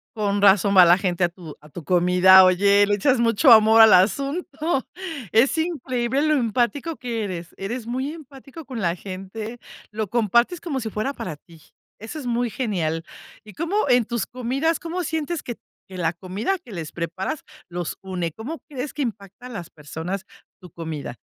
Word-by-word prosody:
Con 205 -1 0
razón 200 0 +5
va 185 -2 +9
la 175 +1 +6
gente 180 -2 -1
a 175 - +3
tu 170 -3 -11
a 150 - -16
tu 165 +2 -9
comida. 180 +3 +6
Oye, 200 +2 +4
le 205 - +2
echas 250 +4 +2
mucho 235 +3 +4
amor 220 0 +7
al 220 - +8
asunto 280 - +1 0.5
Es 265 +8 +3
increíble 265 -5 -1
lo 310 0 +3
empático 250 +6 0
que 235 -3 -3
eres. 175 -3 -6
Eres 225 +4 -5
muy 260 +5 -3
empático 280 0 -12
con 255 -4 -6
la 170 -1 0
gente, 200 +5 -7 0.3
lo 215 -1 -3
compartes 235 - +2
como 285 -6 -3
si 220 -2 -4
fuera 215 +7 -3
para 165 - -6
ti. 160 +1 -19 0.4
Eso 225 +8 -8
es 290 - -7
muy 240 0 0
genial. 170 -10 -2 0.4
¿Y 210 - -13
cómo 335 - -3
en 245 -2 +4
tus 235 -4 -2
comidas, 260 +8 -1
cómo 345 +2 -4
sientes 320 0 -3
que 240 - -6 0.3
que 190 - -10
la 170 -1 0
comida 200 - -3
que 250 -9 -15
les 165 -5 -6
preparas, 180 - -4 0.2
los 175 -2 -5
une? 180 -3 -3
¿Cómo 255 - -7
crees 270 0 -5
que 295 - -4
impacta 215 -1 -6
a - - -11
las 180 -8 -8
personas, 160 +6 -6 0.4
tu 180 - -12
comida? 155 -6 -6
220 Hz, 185 wpm, -23 LUFS, 185-265 Hz, 0.5 s, va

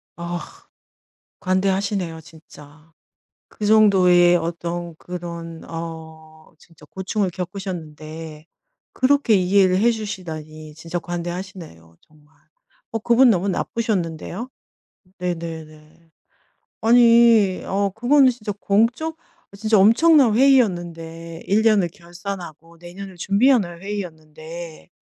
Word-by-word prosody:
아 170 0 -5 1.0
관대하시네요 190 -2 -1
진짜. 155 0 -17 0.6
그 210 - -5
정도의 185 -5 +5
어떤 170 0 -4
그런 170 -2 -8
어 160 -1 -9
진짜 160 -2 -20
고충을 190 +3 -2
겪으셨는데 165 -4 -7 0.5
그렇게 265 -3 +2
이해를 185 0 +3
해 235 +3 +4
주시다니 160 -8 -7
진짜 165 +3 -5
관대하시네요 175 - -7
정말. 150 0 -26 0.6
어 225 - -1
그분 240 +3 +5
너무 195 -1 +1
나쁘셨는데요. 195 0 -3 0.7
네네네. 165 -2 -7 0.7
아니 230 -4 +5
어 200 +1 0
그거는 260 +4 +4
진짜 225 -4 -5
공적 240 +11 +1 0.4
아 - - -12
진짜 215 +1 +2
엄청난 245 +4 +5
회의였는데 170 -10 +1
1 210 +3 +2
년을 210 -6 +3
결산하고 175 -3 -9
내년을 180 +2 -10
준비하는 200 -3 +2
회의였는데 165 -4 -8
180 Hz, 245 characters per minute, -21 LUFS, 165-210 Hz, 1.0 s, 정도의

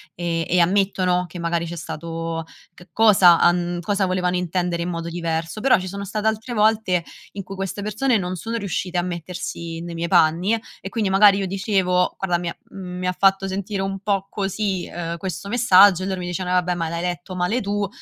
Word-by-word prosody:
e 165 -1 -2
e 180 - +3
ammettono 185 -1 +2
che 175 +2 -10
magari 170 0 -1
c'è 170 +1 -6
stato 165 0 -5 0.3
c 180 +1 -16
cosa 190 -6 +6
han 175 0 +2
cosa 200 +2 0
volevano 180 -1 0
intendere 175 -1 -1
in 175 - -3
modo 165 -1 -4
diverso, 165 +1 -3
però 260 +4 +4
ci 185 0 -5
sono 200 +1 -5
state 210 +2 -2
altre 220 +3 -2
volte 215 -5 +2 0.3
in 200 - -6
cui 195 +2 -8
queste 195 +1 -4
persone 220 +4 +1
non 180 -2 -3
sono 230 +6 -4
riuscite 190 -4 -3
a - - +3
mettersi 170 -1 -5
nei 170 0 -7
miei 170 +1 -2
panni 175 +4 +3 0.2
e - - -6
quindi 215 -1 -1
magari 195 +1 +6
io 195 - -1
dicevo: 190 -2 +1
"Guarda 180 -3 0
mi 170 0 -3
ha - - -7 0.2
mi 180 -1 -5
ha 180 - -1
fatto 195 0 +3
sentire 195 +1 -3
un 195 0 -3
po' 195 -1 -1
così 195 -2 -2 0.3
questo, 190 +3 -5
ehm, 205 - -5
messaggio." 200 -6 +6
E - - -2
loro 190 -1 -2
mi 175 - -5
dicevano: 180 +1 -2
"Eh - - +6
vabbè, 180 0 -2
ma 165 -2 -2
l'hai 170 +1 -3
letto 180 +1 -4
male 180 +7 0
tu, 200 0 -1
185 Hz, 210 wpm, -22 LUFS, 175-200 Hz, 0.3 s, cosa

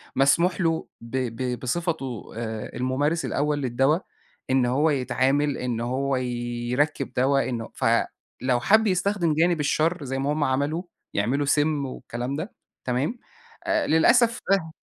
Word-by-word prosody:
مسموح 170 +7 +3
له 165 -2 0
ب 115 +3 -8 0.2
ب 125 0 -2
بصفتُه 135 - -3
آآ، 110 -2 -4
الممارس 145 +6 0
الأول 150 +1 0
للدوا، 135 +5 +2 0.5
إن 130 -1 +3
هو 140 +6 +2
يتعامل، 135 +1 +1
إن 125 -2 -2
هو 135 +3 0
يركّب 125 +3 -1
دوا، 135 +1 +2
إنه 115 -3 -4
فلو 125 -1 0
حَبّ 220 - +4
يستخدم 185 -3 +1
جانب 165 +1 +2
الشرّ 155 +3 +1
زَي 135 0 -3
ما 135 +2 0
هم 150 -1 0
عملوا، 145 +6 0 0.3
يعملوا 130 +8 +1
سِمّ 145 0 +2
والكلام 125 0 -5
ده، 160 +8 -5 0.3
تمام؟ 135 - -1 0.5
آآ، 330 -2 +1
للأسف 235 +9 +4
ده 175 -5 +2
140 Hz, 135 wpm, -25 LUFS, 125-160 Hz, 0.5 s, حَبّ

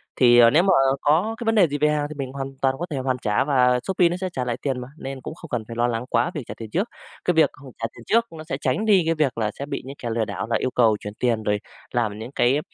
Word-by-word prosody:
thì, 120 -2 +6
à, 115 -1 +8
nếu 155 +8 +4
mà 190 0 +4 0.3
có 175 +10 +2
cái 235 - -6
vấn 225 0 +2
đề 195 -5 +6
gì 145 -1 -3
về 150 +1 +3
hàng 150 -1 0
thì 155 - -7
mình 135 -2 -5
hoàn 135 -1 -4
toàn 135 -1 +2
có 175 - -2
thể 150 - -3
hoàn 130 -1 -1
trả 105 -2 +1
và 125 -3 +3
Shopee 180 0 +2
nó 175 - -2
sẽ 185 - -1
trả 125 - -2
lại 120 -1 -2
tiền 135 -3 -1
mà, 125 - -7
nên 135 -2 -6
cũng 155 - -7
không 165 - -12
cần 120 -4 -2
phải 115 - -7
lo 120 +1 +2
lắng 120 0 -2
quá 175 - +1
về 150 - -4
trả - - -5
tiền 110 -2 -8
trước. 195 - -1 0.4
Cái 180 - +3
việc 160 -1 +5
không 140 -2 -13
trả 115 - -3
tiền 120 - -13
trước 230 +1 +3
nó 155 -1 -8
sẽ 145 -4 -4
tránh 130 +11 0
đi 205 -4 +5
cái 165 0 +1
việc 150 -6 0
là 110 -2 0
sẽ 140 - -3
bị 145 - -4
những 135 +1 -8
kẻ 120 - -5
lừa 115 -1 0
đảo 100 -1 -4
là 115 - 0
yêu 130 - -1
cầu 115 -4 +3
chuyển 105 - -7
tiền, 115 -3 +1
rồi 105 0 0 0.3
làm 110 -4 -1
những 115 +3 -7
cái, 135 +1 +2
135 Hz, 315 wpm, -23 LUFS, 120-155 Hz, 0.4 s, à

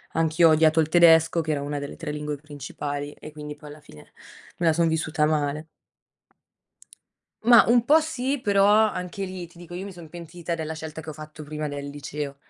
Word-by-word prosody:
Anch'io 165 +1 +4
ho - - +5
odiato 155 +1 +4
il 155 -1 +2
tedesco 165 -1 +5
che 160 - -7
era 145 -2 -1
una 145 0 -3
delle 140 0 -7
3 165 -3 -5
lingue 150 0 -4
principali 145 0 -6
e 155 - -11
quindi 150 0 -8
poi, 150 0 -13
alla 150 - -11
fine, 75 - -16 0.5
me 170 - +1
la 160 - +6
son 170 0 +2
vissuta 160 -1 0
male. 150 0 -1 1.8
Mah, 235 0 +8
un 240 0 +4
po' 310 +2 +6
sì, 285 -3 -2
però 200 -4 +3
anche 205 -3 +2
lì, 185 -2 -7
ti 170 - -22
dico, 175 0 -12
io 185 +3 -5
mi 200 - -8
son 170 -3 -12
pentita 170 0 -6
della 160 -1 -4
scelta 160 0 -7
che 160 - -13
ho 155 - -5
fatto 155 +1 -10
prima 150 0 -5
del 145 0 -6
liceo. 145 0 -6
160 Hz, 205 wpm, -25 LUFS, 150-175 Hz, 1.8 s, Mah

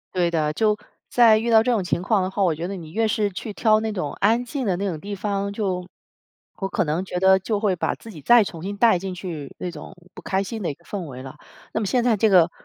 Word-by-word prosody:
对 180 -2 +2
的， 155 -3 0
就 210 +6 +1 0.3
在 230 -3 +6
遇 230 +2 -1
到 220 -1 +6
这 250 - +1
种 225 -4 +1
情 175 -1 -1
况 200 +2 +2
的 185 - -1
话， 195 +1 -1
我 175 -4 +3
觉 165 +3 -4
得 200 - -5
你 165 -4 -9
越 220 +5 +1
是 210 -1 +1
去 205 +3 -6
挑 215 +1 +3
那 220 0 -2
种 165 -8 -3
安 225 +4 +3
静 255 +2 -4
的 190 -4 +1
那 195 +3 -3
种 165 -5 -3
地 200 +4 -6
方 200 0 -2
就 185 -4 -2 0.7
我 195 - -2
可 195 - 0
能 160 +3 -1
觉 180 - -4
得 190 +1 +5
就 205 +2 -2
会 205 -3 +2
把 - - -1
自 225 - -12
己 160 -7 -11
再 235 - +6
重 170 -5 -7
新 200 +4 -4
带 220 -5 +4
进 190 0 -5
去 165 -6 -7
那 180 - -4
种 160 +3 -10 0.2
不 - - -11
开 190 +1 -1
心 220 +2 -6
的 180 - -1
一 - - -3
个 170 - -24
氛 190 0 -5
围 130 -3 -8
了。 135 +2 -10 0.4
那 - - 0
么 220 - -2
现 245 +4 +1
在 235 -3 +3
这 220 +2 +3
个， 175 -3 +5
195 Hz, 300 characters per minute, -23 LUFS, 175-215 Hz, 0.7 s, 在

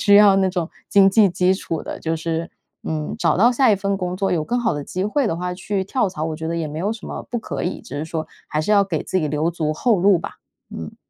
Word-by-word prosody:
需 205 - +5
要 205 -2 +7
那 190 -1 +3
种 175 -3 -2 0.2
经 195 -1 +6
济 210 +1 +5
基 180 +1 +2
础 165 -4 -4
的。 - - -6
就 160 0 -2
是 165 +1 -3 0.4
嗯， 155 -1 -3
找 - - +2
到 230 +6 +5
下 250 -2 +4
一 - - +5
份 200 0 -1
工 180 -1 -3
作， 195 +1 0
有 160 -3 0
更 245 +7 -1
好 240 - +1
的 145 -1 -4
机 185 +1 -3
会 250 +6 +1
的 165 - -1
话， 180 +1 -3
去 190 +2 -2
跳 200 +2 0
槽， 155 -4 -6
我 160 -1 -3
觉 160 0 -5
得 170 - -2
也 165 -2 -2
没 150 +1 -6
有 200 +6 0
什 225 -3 -9
么 - - -6
不 240 - -3
可 - - -4
以， 180 - -3
只 145 - -7
是 150 - -3
说 160 0 -4 0.2
还 155 - -1
是 185 - -2
要 200 -1 +5
给 170 -5 -2
自 185 - -1
己 155 - 0
留 150 +3 0
足 155 -2 -1
后 220 +4 +2
路 195 +1 +5
吧， - - -7 0.3
嗯。 80 -1 -7
180 Hz, 305 characters per minute, -21 LUFS, 160-200 Hz, 0.4 s, 要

